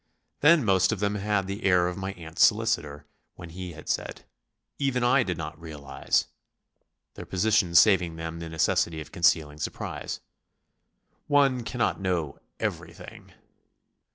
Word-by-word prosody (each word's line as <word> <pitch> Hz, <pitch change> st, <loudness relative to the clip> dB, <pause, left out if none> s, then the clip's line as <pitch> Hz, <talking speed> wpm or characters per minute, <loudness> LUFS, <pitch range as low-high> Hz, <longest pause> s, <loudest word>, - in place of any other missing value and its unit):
They 160 Hz, +4 st, +7 dB
most 95 Hz, -, +2 dB
of 110 Hz, -, -2 dB
them 100 Hz, 0 st, 0 dB
had 105 Hz, -1 st, -1 dB
the 100 Hz, +2 st, -6 dB
air 90 Hz, -2 st, +3 dB
of 90 Hz, -, -3 dB
my 95 Hz, 0 st, -5 dB
aunt's 80 Hz, -3 st, -1 dB
solicitor 95 Hz, -10 st, +1 dB, 0.3 s
when 85 Hz, -2 st, -10 dB
he 90 Hz, 0 st, -7 dB
had 80 Hz, 0 st, -13 dB
said, -, -, -3 dB, 0.6 s
"Even 135 Hz, -3 st, 0 dB
I 125 Hz, +2 st, +4 dB
did 90 Hz, -8 st, -2 dB
not 80 Hz, 0 st, -7 dB
realise...." 75 Hz, -4 st, -2 dB, 0.9 s
their -, -, -10 dB
positions 95 Hz, -3 st, +2 dB
saving 90 Hz, -3 st, +5 dB
them 80 Hz, 0 st, -6 dB
the 85 Hz, -1 st, -6 dB
necessity 80 Hz, 0 st, 0 dB
of 80 Hz, 0 st, -9 dB
concealing 80 Hz, -4 st, +1 dB
surprise. 75 Hz, -, -5 dB, 1.1 s
"One 135 Hz, -4 st, +3 dB
can't 115 Hz, +2 st, -1 dB
know 90 Hz, -6 st, -2 dB, 0.2 s
everything." -, -, -6 dB
90 Hz, 140 wpm, -26 LUFS, 80-105 Hz, 1.1 s, They